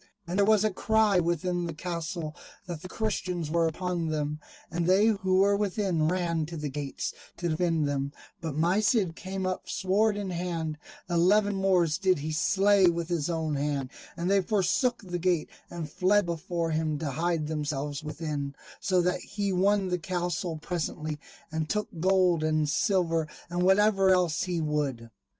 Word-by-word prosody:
And 180 +3 -2
there 200 - +4
was 215 -2 +5
a 215 - +2
cry 215 0 +3
within 175 +1 0
the 165 - -5
castle 170 -1 -4 0.3
that 170 -3 -6
the 185 - -8
Christians 180 -7 -2
were 165 0 +3
upon 175 0 -2
them, 150 -1 -2 0.3
and 170 0 -1
they 190 +3 +5
who 190 -3 +2
were 200 +1 +4
within 195 -5 0
ran 170 -3 0
to 165 0 -6
the 150 -1 -3
gates 140 -1 -4 0.2
to 175 0 -2
defend 160 -2 +1
them, 140 0 -1 0.3
but 160 -4 -4
my 175 +5 +3
Cid 210 -6 +2
came 190 +1 -4
up 185 0 -3
sword 205 +3 +1
in 200 -2 -3
hand; 165 -3 -3 0.3
eleven 200 +4 +3
Moors 185 -4 +2
did 190 -2 +3
he 150 +2 -4
slay 195 +4 +4
with 170 0 0
his 170 -3 -1
own 160 -2 -1
hand, 140 -2 -1 0.3
and 170 +1 -2
they 195 +1 +4
forsook 220 +5 +1
the 175 -2 -4
gate 175 -2 0 0.2
and 170 -3 -5
fled 195 +3 +3
before 170 0 -2
him 155 -1 0
to 145 -2 -3
hide 165 +2 0
themselves 150 -2 -3
within, 150 -2 -4 0.2
so 185 -2 +2
that 180 +1 +1
he 200 +1 -3
won 195 +1 +2
the 180 0 0
castle 175 -2 -2
presently, 155 -2 -3 0.3
and 160 -1 -2
took 210 -1 0
gold 180 -2 +3
and 155 -1 +1
silver, 165 -2 +1 0.2
and 175 0 -1
whatever 195 +1 +4
else 180 -4 +2
he 180 -2 -1
would. 145 -7 -2
175 Hz, 175 wpm, -28 LUFS, 155-190 Hz, 0.3 s, was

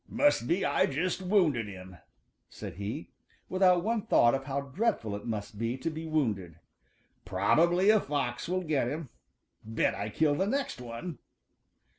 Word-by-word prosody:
"Must 290 - +2
be 180 +6 +1
I 140 - +3
just 175 +7 -1
wounded 175 - +2
him," 95 -2 -10 0.5
said - - -8
he, 105 +10 -5 0.4
without 185 -2 +4
one 225 +1 0
thought 120 - +5
of 135 0 -2
how 140 0 -1
dreadful 140 - -1
it 105 - -7
must 105 -2 -4
be 115 +3 -1
to 160 +5 -3
be 160 +1 -6
wounded. 105 - -1 0.7
"Probably 170 - +3
a 215 - +5
fox 140 -3 -2
will 185 +1 0
get 150 -7 +1
him. 150 +1 -4 0.5
Bet 110 +1 0
I 100 +2 -4
kill 150 +7 +2
the 190 +7 0
next 270 - -2
one!" 125 +6 -6
140 Hz, 160 wpm, -30 LUFS, 115-180 Hz, 0.7 s, thought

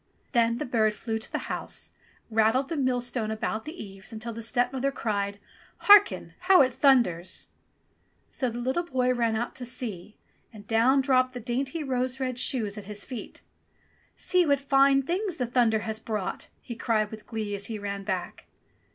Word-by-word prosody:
Then 235 -2 +2
the - - -3
bird 220 -3 +2
flew 220 0 -3
to 220 - -8
the - - 0
house, - - -5 0.4
and 225 - -9
rattled 235 +5 +3
the 330 - -2
millstone 245 -4 0
about 220 +1 -3
the 315 +4 -7
eaves 195 +1 -11
until 225 +1 -5
the 230 - -6
stepmother 250 +4 0
cried, 200 -5 -2 0.4
"Harken! 410 -1 +6
How 365 -4 +6
it 260 - 0
thunders 185 - +2 0.4
!" - - -42
So 255 - -1
the 235 - -6
little 260 +7 0
boy 255 -6 0
ran 230 -2 +1
out 235 +2 -2
to 255 - -7
see, 220 -5 -5 0.3
and 210 -3 -12
down 235 +5 +4
dropped 255 -1 +2
the - - -3
dainty 265 +6 -2
rose 255 -1 -1
red 255 -2 -2
shoes 220 -5 0
at 200 - -10
his 205 0 -5
feet. 250 -4 -8 0.7
"See 365 -1 +2
what 285 -4 +2
fine 275 0 +4
things 365 +5 -2
the 250 - -1
thunder 235 -3 +2
has 220 0 -3
brought 215 -4 -4
!" - - -40
he 240 - -6
cried 220 -3 0
with 215 -1 -10
glee 220 -3 -4
as 200 0 -4
he 225 - -4
ran 200 -1 -4
back. 190 -3 -4
240 Hz, 185 wpm, -27 LUFS, 215-265 Hz, 0.7 s, Harken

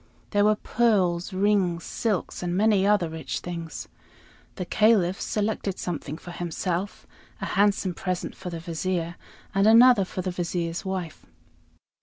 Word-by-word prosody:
There 205 -1 +3
were 215 0 +4
pearls, 200 -7 +1
rings, 190 -3 +1
silks, 215 -6 -2
and 175 0 -1
many 205 -2 +3
other 205 -5 +3
rich 160 0 -5
things. 170 -2 -6 0.7
The 180 - -4
Caliph 200 -3 +3
selected 205 -2 -1
something 155 -3 -4
for 175 - -10
himself, 175 +2 -3 0.3
a - - -3
handsome 200 -2 +2
present 185 0 -3
for 180 - -7
the 170 -1 -5
Vizier, 170 0 -2 0.4
and 195 +2 +3
another 230 -1 +7
for 185 0 -5
the 185 - -2
Vizier's 175 0 -2
wife. 185 -5 -5
185 Hz, 140 wpm, -26 LUFS, 175-205 Hz, 0.7 s, another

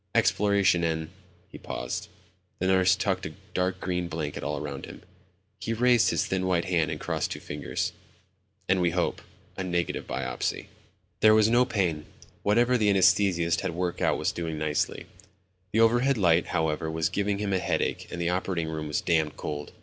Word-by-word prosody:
"Exploration 100 -4 +3
and 80 -1 -1 0.2
..." 90 -1 -33
he - - -10
paused; - - -4 0.5
the 95 - -2
nurse 95 0 +4
tucked 95 -4 -1
a 80 - -9 0.2
dark 90 0 0
gray 90 -1 -1
blanket 80 -4 -4
all - - -2
around - - -6
him. - - -11 0.6
He 115 - -2
raised 120 0 +4
his - - +1
thin 95 0 -1
white 90 -1 +1
hand 85 -4 +1
and 75 -1 -4
crossed - - -2
two - - -5
fingers... 75 0 -3 0.8
"and 95 0 +2
we 90 - +3
hope, 90 +1 -1 0.3
a 95 - -3
negative 85 -2 -2
biopsy." 65 -2 -3 0.5
There 110 0 +6
was 110 0 +5
no 120 +2 +4
pain. 90 -10 -1 0.3
Whatever 120 +4 +3
the 105 -1 +3
anesthetist 95 -3 +3
had 95 -4 -3
worked 90 0 -2
out - - +2
was - - 0
doing 80 -2 -4
nicely. 75 -1 -1 0.7
The 110 - +3
overhead 120 +4 +4
light, 85 -4 +3
however, 80 0 -1
was 80 0 0
giving 100 0 -1
him 100 -1 -2
a 95 - +2
headache - - -1
and 85 - -5
the 85 0 0
operating 90 -2 -1
room 80 -1 -4
was 75 - -1
damned 80 -3 +1
cold. 75 -1 -5
90 Hz, 180 wpm, -27 LUFS, 80-100 Hz, 0.8 s, There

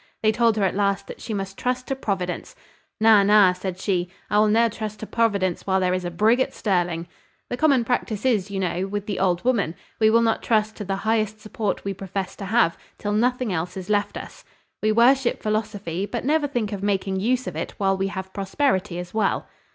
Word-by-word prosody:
They 215 - +5
told 230 0 +2
her 205 - +1
at 190 - +2
last 200 0 0
that - - -10
she - - -6
must 195 -2 -4
trust 250 0 -1
to 270 - -2
Providence. 195 - -3 0.4
`Na, 215 -2 +6
na,' 200 -2 +6
said 185 0 -5
she, 180 -3 0 0.2
`I 210 - +4
will 215 - +5
ne'er 230 +2 +4
trust 215 -1 -6
to - - -4
Providence 200 -7 0
while 190 0 +3
there 180 -1 +1
is 185 0 -1
a 175 - -2
brigg 215 +8 +3
at 260 - 0
Stirling.' 175 -4 0 0.4
The 245 - -1
common 275 -5 +3
practice 225 -2 -1
is, 215 -6 +2
you 195 -1 -3
know, 180 0 -1
with 205 0 -4
the 205 -2 -3
old 180 +1 +1
woman. 205 -10 +1 0.2
We 220 -1 +5
will 230 +1 +4
not 225 -1 +1
trust 215 -2 +1
to 210 - -4
the 195 0 -2
highest 215 -1 +1
support 215 -1 -3
we 200 - -1
profess 195 0 -5
to 200 - -6
have, 200 -4 +2 0.2
till 205 0 -2
nothing 245 0 +1
else 180 +2 -3
is 185 +2 -5
left 205 -1 0
us. - - -9 0.4
We 215 - +2
worship 245 +3 +3
philosophy, 205 -4 -2
but 240 +2 -4
never 300 +1 +2
think 240 -7 -2
of 195 - -4
making 195 -1 0
use 250 +5 +1
of 180 - -5
it 160 - -4
while 195 -1 +2
we 190 0 -1
have 190 -1 -6
prosperity 195 -2 0
as 180 0 -7
well." 215 -2 0
205 Hz, 220 wpm, -24 LUFS, 190-225 Hz, 0.4 s, `Na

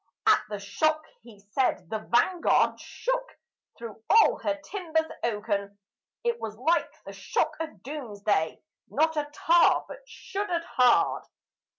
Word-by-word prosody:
At - - +5
the 210 - -4
shock, 310 +10 0 0.2
he 225 -2 -15
said, 255 -9 0
the 220 - -1
Vanguard 245 +11 +2
shook - - -4 0.4
through 230 -2 -9
all 445 +1 +5
her 295 -1 -2
timbers 325 -5 -1 0.2
oaken; 205 -3 -2 0.5
It 475 -1 0
was 215 -1 -5
like 320 +8 +1
the - - -8
shock - - -1
of 320 -1 -6
Doomsday, 205 - -2 0.3
not 320 +2 +1
a 295 -1 -2
tar 335 +3 +4
but - - -9
shuddered 390 -7 -3
hard. 250 -7 +3
295 Hz, 130 wpm, -27 LUFS, 215-340 Hz, 0.5 s, At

